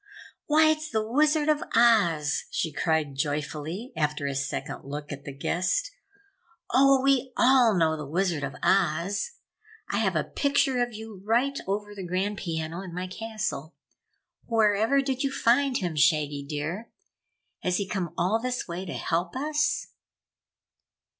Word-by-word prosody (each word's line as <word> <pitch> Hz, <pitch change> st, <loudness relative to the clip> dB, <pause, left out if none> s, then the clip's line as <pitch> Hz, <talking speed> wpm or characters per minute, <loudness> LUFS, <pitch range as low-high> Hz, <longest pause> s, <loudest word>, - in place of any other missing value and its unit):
"Why, 310 Hz, +1 st, +5 dB
it's 310 Hz, 0 st, -3 dB
the 220 Hz, -3 st, -1 dB
Wizard 300 Hz, +4 st, +2 dB
of 305 Hz, -1 st, +2 dB
Oz!" 175 Hz, -11 st, +3 dB
she 160 Hz, -, -2 dB
cried 160 Hz, -2 st, 0 dB
joyfully, 150 Hz, -, -3 dB
after 150 Hz, -2 st, -1 dB
a 140 Hz, -, -1 dB
second 140 Hz, +1 st, -4 dB
look 145 Hz, +2 st, -6 dB
at 140 Hz, -1 st, -7 dB
the 140 Hz, -, -5 dB
guest. 185 Hz, -, -1 dB, 0.8 s
"Oh, 270 Hz, 0 st, +5 dB
we 270 Hz, -2 st, +2 dB
all 245 Hz, -4 st, +5 dB
know 160 Hz, -2 st, +3 dB
the 150 Hz, -2 st, -6 dB
Wizard 170 Hz, -1 st, 0 dB
of 140 Hz, 0 st, -4 dB
Oz! 195 Hz, -, +1 dB, 0.6 s
I -, -, 0 dB
have -, -, +1 dB
a -, -, +2 dB
picture 280 Hz, -3 st, +1 dB
of 240 Hz, 0 st, 0 dB
you 220 Hz, -3 st, -9 dB
right 245 Hz, +6 st, +1 dB
over 205 Hz, +1 st, -2 dB
the 200 Hz, -, -7 dB
grand 190 Hz, +3 st, -2 dB
piano 165 Hz, 0 st, -4 dB
in 180 Hz, -3 st, -8 dB
my 180 Hz, +1 st, -3 dB
castle. 215 Hz, -5 st, -5 dB, 0.7 s
Wherever 225 Hz, +4 st, +3 dB
did 265 Hz, -1 st, -2 dB
you 275 Hz, -, 0 dB
find 260 Hz, +1 st, +2 dB
him, 175 Hz, -4 st, -3 dB
Shaggy 145 Hz, -1 st, +2 dB
dear? 160 Hz, +9 st, -4 dB, 0.7 s
Has 180 Hz, 0 st, 0 dB
he 200 Hz, -, -2 dB
come 190 Hz, -6 st, -3 dB
all 205 Hz, +6 st, +1 dB
this 250 Hz, 0 st, -3 dB
way 175 Hz, +2 st, -5 dB
to 170 Hz, -, -5 dB
help 170 Hz, +3 st, -2 dB
us?" 300 Hz, +2 st, 0 dB
195 Hz, 155 wpm, -27 LUFS, 160-255 Hz, 0.8 s, Why